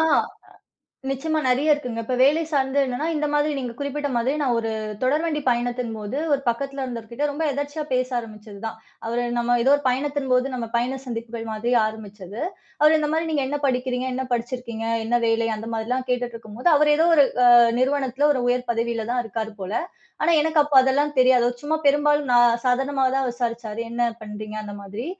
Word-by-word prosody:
ஆ, - - +4 1.1
நிச்சியமா, 310 +4 -1
நெறைய 275 +5 +3
இருக்குங்க. 250 -6 -4
இப்ப 255 - -1
வேலை 290 +5 +4
சார்ந்து 275 -1 +1
என்னன்னா, 255 +4 -3
இந்த 300 0 0
மாதிரி 295 +1 +2
நீங்கக் 240 -2 -6
குறிப்பிட்ட 285 +1 -3
மாதிரி, 245 +4 +1
நான் 255 -4 +1
ஒரு 225 -1 -3 0.3
தொடர்வண்டி 300 +3 +1
பயணத்தின் 240 -1 -1
போது, 215 +5 -5 0.2
ஒரு 280 - +1
பக்கத்துல 275 +3 -3
இருந்தவர்கிட்ட 235 +2 -4
ரொம்ப 300 +3 -3
எதாச்சயா 285 +2 -3
பேச 255 0 +1
ஆரம்பிச்சது 215 -3 -11
தான். 220 - -5 0.3
அவரு 235 +1 -1
நம்ம 240 0 +2
ஏதோ 270 - +4
ஒரு 290 - -6
பயணத்தின் 280 +1 -2
போது 250 +2 +2
நம்ம 235 -2 -4
பயண 250 +3 0
சந்திப்புக்கள் 230 -1 -6
மாரி 225 +3 -1
ஆரம்பிச்சது. 210 -2 -8 0.4
அவரு 305 +1 +6
இந்த 300 -1 -1
மாரி 325 +1 0
நீங்க 290 -3 +1
என்ன 290 +2 -2
படிக்கிறீங்க, 255 -1 -1
என்ன 260 +1 -2
படிச்சிருக்கீங்க, 235 -1 -4 0.2
என்ன 240 +2 +2
வேலை? 225 0 +1
அந்த 220 +2 -7
மாதிரில்லாம் 245 +3 -2
கேட்டுட்டுருக்கும்போது, 240 +1 -2
அவரு 295 0 +4
ஏதோ 325 +2 +4
ஒரு 290 -3 +6 0.2
அ - - +7 0.3
நிறுவனத்துல 265 +1 +1
ஒரு 260 - -1
உயர் 250 0 -1
பதவியில 230 -1 -2
தான் 245 0 +1
இருக்காரு 220 +1 -4
போல. 190 +2 -5 0.5
ஆனா, 330 - +3
எனக்கு 315 0 +1
அப்ப 295 0 -5
அதெல்லாம் 285 +3 +1
தெரியாது. 255 -1 +5 0.2
சும்மா 305 +2 0
பெரும்பாலும் 290 0 +3
நான் 240 -1 +5
சாதாரணமா 270 +2 +1
தான் 270 -1 +1
விசாரிச்சாரு. 230 -2 -4
என்ன 235 +1 -2 0.2
பண்றீங்க? 215 0 -7
அந்த 205 -1 -7
மாதிரி. 205 +5 -7
250 Hz, 180 wpm, -23 LUFS, 230-285 Hz, 1.1 s, அ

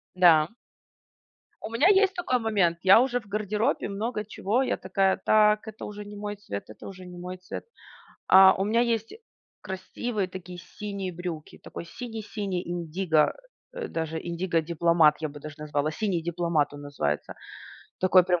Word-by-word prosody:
Да. 165 -4 +6 1.1
У - - -4
меня 240 +10 +3
есть 390 -1 +5
такой 345 -9 0
момент. 200 -7 +1
Я 190 +4 +8
уже 245 -1 +1
в 215 - -21
гардеробе 210 +5 -1
много 210 +2 -3
чего, 215 +4 0
я 265 - 0
такая: 190 +1 +1
"Так, 215 0 +4
это 215 0 -8
уже 210 0 -7
не 205 0 -10
мой 205 0 -5
цвет, 100 - -7
это 110 - -11
уже 185 -1 -10
не 180 0 -10
мой 180 +1 -6
цвет". 185 - -8 0.6
А, 190 0 +8
у 195 - -1
меня 230 +3 +2
есть 230 -2 -1 0.5
красивые 190 +2 -3
такие 180 -1 -9
синие 195 +1 -6
брюки, 170 -3 -7
такой - - -8
синий-синий 210 -3 -5
индиго, 170 -2 +1 0.4
э, - - -5
даже 160 -1 -3
"индиго 170 0 -1
дипломат", 165 -2 +3
я 155 - -2
бы 145 +1 -11
даже 155 +1 -9
назвала. 150 0 -1
"Синий 180 -1 -1
дипломат" 170 -3 0
он 145 - -9
называется. 105 - -3 0.7
Такой 185 -1 +6
прям 180 -1 +1
185 Hz, 165 wpm, -27 LUFS, 170-210 Hz, 1.1 s, Я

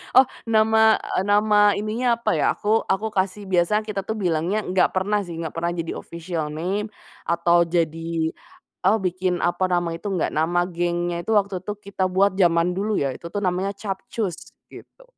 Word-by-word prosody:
Oh, 260 - +8 0.2
nama 220 0 +4 0.2
eee, 185 - +2
nama 205 0 +4
ininya 225 +4 0
apa 235 - 0
ya, - - +2
aku 215 +2 0
aku 200 +3 0
kasih 195 0 -1
biasa 185 +4 +2
kita 200 -3 -4
tuh 220 - -2
bilangnya 180 0 0
enggak 185 -2 +1
pernah 200 +3 +1
sih, 175 - -7
enggak 165 -2 -5
pernah 170 +1 0
jadi 165 -1 -4
official 165 -3 -5
name, 190 +7 -2 0.4
atau 170 0 +3
jadi, 165 -1 -1 0.6
eee, 205 +4 +5
bikin, 180 0 0
apa, 175 +2 +1
nama 175 -2 0
itu 170 +5 -5
enggak. 190 -4 -1
Nama 165 +3 +1
gengnya 175 0 -1
itu 220 - -3
waktu 200 -3 +1
itu 210 - -4
kita 195 -2 -2
buat, 190 +2 +3
zaman 170 0 +3
dulu 205 +3 -1
ya, 135 -2 0
itu 170 - -9
tuh 205 +4 -3
namanya 185 +2 0
Capcus, 200 -1 -4 0.4
gitu. - - -14
185 Hz, 180 wpm, -23 LUFS, 170-210 Hz, 0.6 s, Oh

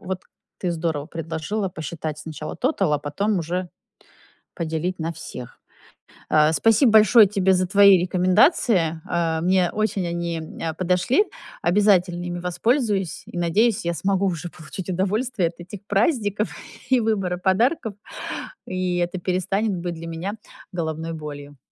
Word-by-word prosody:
вот 185 0 -5 0.4
ты 180 - -1
здорово 160 -3 -2
предложила 165 +5 -3
посчитать 155 -2 -5
сначала 155 -1 -7
тотал, 205 - +1
а 145 - +1
потом 195 +8 -1
уже 175 +2 -3 0.9
поделить 170 +2 -2
на 165 +1 -2
всех. 125 -6 -9 0.7
А, 155 0 +5
спасибо 225 - +4
большое 215 0 +7
тебе 195 -1 +2
за 185 0 +1
твои 200 -1 +7
рекомендации. 180 - +3
Э, 165 -1 0
мне 180 0 +3
очень 210 -3 -1
они, 170 -1 -2 0.2
э, 165 -1 -2
подошли. 185 - +2 0.4
Обязательно 180 -2 +3
ими 175 0 -4
воспользуюсь. 200 - 0
И - - -10
надеюсь, 190 +5 +2
я 170 - 0
смогу 195 +4 0
уже 175 -2 -2
получить 175 +3 -9
удовольствие 195 +2 0
от 165 - -15
этих 180 +3 -9
праздников, 210 - +1 0.4
и 260 -1 +5
выбора 195 -5 0
подарков. 220 - +1 0.7
И 185 -1 -1
это 175 +1 -1
перестанет 190 +3 0
быть 175 0 -4
для 165 0 -8
меня 175 +6 -4 0.4
головной 165 -1 -3
болью. 145 -2 -8
180 Hz, 140 wpm, -23 LUFS, 165-200 Hz, 0.9 s, большое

